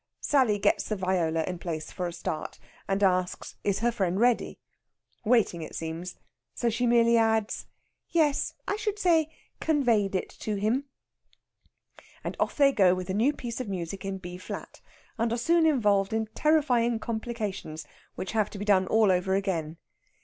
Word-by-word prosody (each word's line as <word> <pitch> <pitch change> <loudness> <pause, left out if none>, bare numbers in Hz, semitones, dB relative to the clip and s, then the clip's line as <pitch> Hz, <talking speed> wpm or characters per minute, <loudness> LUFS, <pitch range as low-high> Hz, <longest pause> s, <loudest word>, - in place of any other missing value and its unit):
Sally 255 -8 +3
gets 200 - +1
the 215 - 0
viola 175 -4 0
in 180 +1 -4
place 160 -3 -5
for 180 - -3
a - - -4
start, 170 -2 -5 0.3
and 195 +1 0
asks 185 -1 +1
is 200 +1 0
her 240 +1 +2
friend 190 -4 -1
ready? 240 0 +2 0.7
Waiting, 220 -7 +2
it 155 - -7
seems; 165 +2 -5 0.4
so 235 -1 0
she 245 +2 0
merely 235 0 +5
adds, 220 -1 +1 0.4
"Yes, 305 -4 +1
I 410 - 0
should 425 -1 -2
say 330 -6 +3 0.3
conveyed 235 -11 +2
it 185 - -1
to 215 - -2
him." 220 +7 0 1.4
And - - -4
off - - 0
they 280 -2 +6
go 185 -7 +4
with 185 0 -6
the - - 0
new 230 +8 +3
piece 240 -4 -5
of 235 - -5
music 185 0 -4
in 195 0 -3
B 180 -1 -8
flat, - - -8 0.4
and 230 0 +1
are 235 - 0
soon 330 +6 +3
involved 205 -9 +2
in 220 0 0
terrifying 250 -7 +2
complications 220 -9 -4 0.3
which 185 - -4
have 215 -2 +1
to - - -9
be 205 - -4
done 190 -3 +3
all 220 -3 +4
over 185 +1 +1
again. 170 -5 -2
210 Hz, 170 wpm, -28 LUFS, 185-240 Hz, 1.4 s, they